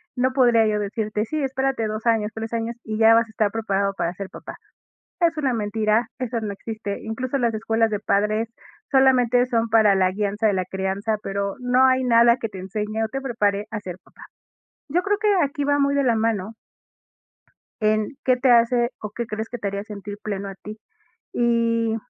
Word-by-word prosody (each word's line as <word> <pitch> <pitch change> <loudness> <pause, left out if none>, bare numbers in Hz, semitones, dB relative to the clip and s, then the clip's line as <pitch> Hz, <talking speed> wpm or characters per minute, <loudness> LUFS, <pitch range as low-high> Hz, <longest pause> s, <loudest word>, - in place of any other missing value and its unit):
No 255 0 +1
podría 240 -4 +4
yo 210 -1 0
decirte, 210 +1 -2
sí, 310 +6 -3
espérate 265 -3 -1
2 215 +2 -5
años, 220 -2 +2
3 225 +1 -6
años, 230 +1 -2
y 215 -1 -4
ya 225 0 +7
vas 230 0 +4
a - - -21
estar 215 -1 0
preparado 200 -3 -1
para 170 -2 -2
ser 195 +1 -7
papá. - - -10 0.6
Es 335 -2 +2
una 275 -4 +1
mentira, 215 +1 0
eso 245 -2 -2
no 210 -2 -4
existe. 210 0 -6
Incluso, 255 +5 -3
las 235 -3 +1
escuelas 225 +1 +1
de 210 -1 -2
padres, 215 +3 0 0.4
solamente 250 -2 +4
son 230 -2 0
para 220 -3 +5
la 185 -1 +2
guianza 205 +2 -1
de 210 - +3
la 185 -1 0
crianza, 195 +3 -2
pero, 200 0 -2
no 250 +1 +4
hay 260 0 +2
nada 235 0 +5
que 225 - -3
te 195 - -9
enseñe 210 +4 -3
o - - -3
te 270 +5 -4
prepare 210 -5 0
a 215 -2 -4
ser 180 -3 -7
papá. - - -19 0.7
Yo 340 +6 +1
creo 410 +1 0
que 425 -1 +2
aquí 285 +1 -3
va 285 0 +2
muy 280 0 +2
de 280 - +2
la 235 -3 +2
mano 220 -2 -1 1.3
en, 215 0 +2
¿qué 255 -1 +3
te 255 0 +3
hace 240 +1 +4
o 210 - -5
qué 235 +3 -5
crees 220 0 -5
que 245 - -5
te 205 - -4
haría 200 0 -3
sentir 205 -1 -8
pleno 200 -2 -4
a 195 - -7
ti? 210 +2 -10 0.6
Y 230 -1 +1
225 Hz, 205 wpm, -23 LUFS, 210-245 Hz, 1.3 s, ya